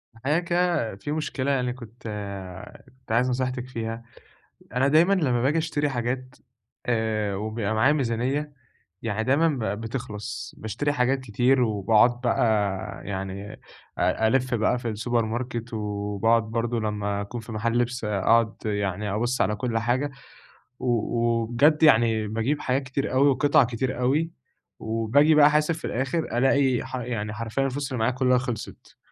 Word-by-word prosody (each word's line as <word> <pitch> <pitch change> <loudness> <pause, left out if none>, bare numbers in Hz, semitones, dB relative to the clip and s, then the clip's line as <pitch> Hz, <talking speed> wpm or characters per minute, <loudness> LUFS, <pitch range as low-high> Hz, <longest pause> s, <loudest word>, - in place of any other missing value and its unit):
الحقيقة 140 +8 0
كده 170 - 0
في 100 +9 -6
مشكلة 145 -3 -1
يعني 125 -2 0
كنت 120 -1 -13 0.8
كنت 130 -2 -15
عايز 125 +3 +3
نصيحتك 125 0 -2
فيها، 115 -1 -5 0.7
أنا 130 +2 +2
دايمًا 160 +7 +5
لما 135 -11 +1
باجي 140 +6 +2
اشتري 155 -2 0
حاجات 125 0 -3 0.5
آآ، 110 -4 0
وبيبقى 110 +1 -2
معايا 125 +7 +4
ميزانيّة، 135 +2 -1 0.5
يعني 110 -1 -2
دايمًا 140 +7 +3 0.3
ب 105 - -8
بتخلص، 115 -3 -6
باشتري 115 +7 -2
حاجات 135 0 +1
كتير 130 +2 +2
وباقعُد 110 +2 +3
بقى 120 -1 +2 0.6
يعني 95 +1 -5 0.4
أ 110 - +2
ألِف 130 +1 +1
بقى 120 +2 +1
في 120 - -3
السوبر 115 +1 0
ماركت، 120 +1 -4
وباقعُد 105 +2 0
برضو 115 +2 -2
لما 105 -2 -2
أكون 115 +4 -6
في 115 - -10
محل 115 +2 0
لِبس، 120 0 -1
أقعُد 105 +2 +2
يعني 100 -1 -1
أبص 120 +4 0
على 105 +2 +1
كل 115 +2 -2
حاجة، 125 +5 0 0.7
و - - -4 0.3
وبجد 120 +6 +2
يعني 115 -6 +4
باجيب 115 +8 -1
حاجات 130 +2 0
كتير 135 +1 -3
أوي 135 +2 +4
وقِطع 145 +2 +4
كتير 125 +1 -2
أوي، 145 +7 +1 0.5
وباجي 115 +8 +3
بقى 145 -1 +8
أحاسب 150 +2 +2
في 160 - -7
الآخر 135 +6 -1 0.2
ألاقي 135 0 +3
ح - - -6
يعني 115 -4 -3
حرفيًا 115 +4 -2
الفلوس 140 +1 -3
اللي 130 - -2
معايا 110 +3 +2
كلها 125 0 +3
خلصت. 120 -4 -6
120 Hz, 150 wpm, -25 LUFS, 110-135 Hz, 0.8 s, بقى